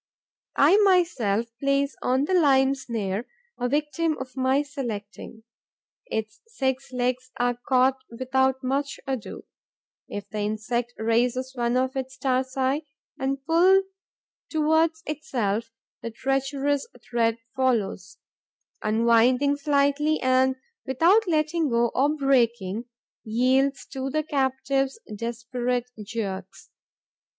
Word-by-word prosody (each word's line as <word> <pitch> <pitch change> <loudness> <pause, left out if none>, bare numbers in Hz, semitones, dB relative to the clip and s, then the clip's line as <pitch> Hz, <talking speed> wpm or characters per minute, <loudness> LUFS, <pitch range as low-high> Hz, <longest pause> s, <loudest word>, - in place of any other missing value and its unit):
I 395 - +6
myself 335 - +3
place 275 +1 +1
on 260 +3 +1
the 375 - -1
lime 275 -6 +4
snare 225 -5 -3 0.3
a 245 - 0
victim 300 +3 0
of 260 -1 -7
my 265 +2 +2
selecting. 235 -5 -7 0.6
Its 220 - -4
six 265 - -2
legs 250 0 -1
are 245 0 +2
caught 260 0 +3
without 260 +2 0
more 270 +2 +1 0.2
ado. 265 -5 -5 0.6
If 205 -1 -6
the 210 +1 -5
insect 220 +3 -2
raises 245 +3 0
one 240 -1 0
of 260 +1 0
its 265 0 -4
tarsi 260 +3 0 0.3
and 270 0 -2
pulls 365 +4 +5 0.7
towards 320 +1 +2
itself, 240 -9 -2 0.3
the 230 - -4
treacherous 270 +3 -1 0.2
thread 230 -1 +1 0.2
follows, 225 -7 -1 0.6
unwinds 235 +6 +3
slightly 285 +1 +2
and, 260 0 +3 0.3
without 345 - +3
letting 315 -1 +1
go 235 0 +2
or 275 +3 +3
breaking, 235 -7 +1 0.4
yields 255 +5 +1
to 265 0 -3
the 310 +3 0
captive's 270 - 0 0.2
desperate 240 +2 -3
jerks. 200 -3 -6
260 Hz, 110 wpm, -25 LUFS, 235-280 Hz, 0.7 s, I